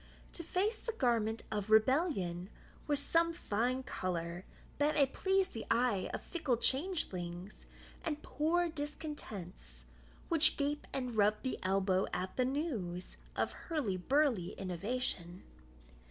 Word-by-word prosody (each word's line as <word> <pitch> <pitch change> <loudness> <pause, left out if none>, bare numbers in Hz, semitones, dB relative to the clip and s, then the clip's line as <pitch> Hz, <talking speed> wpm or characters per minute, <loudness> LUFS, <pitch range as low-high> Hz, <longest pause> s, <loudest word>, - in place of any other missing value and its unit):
To 335 - -5
face 405 +7 0
the 460 - -4
garment 230 - +1
of 210 -1 -2
rebellion 220 - +3 0.4
With 290 -1 +2
some 330 +4 +2
fine 250 -3 0
colour, 175 -4 -3 0.3
that 295 +1 +3
may 280 - +6
please 380 +7 +1
the 225 - -6
eye 230 -5 +2
Of - - -4
fickle 300 -8 0
changelings, 200 - -1 0.4
and 300 -2 -3
poor 340 +4 +1
discontents, 225 - -6 0.4
Which 325 -2 +6
gape 290 +1 -1
and 250 -3 -3
rub 210 0 +3
the 260 - -2
elbow 190 0 +2
at 185 +1 -2
the 255 - +2
news 240 - -2 0.2
Of - - 0 0.2
hurlyburly 255 - +1
innovation. 185 -1 -2
245 Hz, 125 wpm, -34 LUFS, 190-300 Hz, 0.4 s, may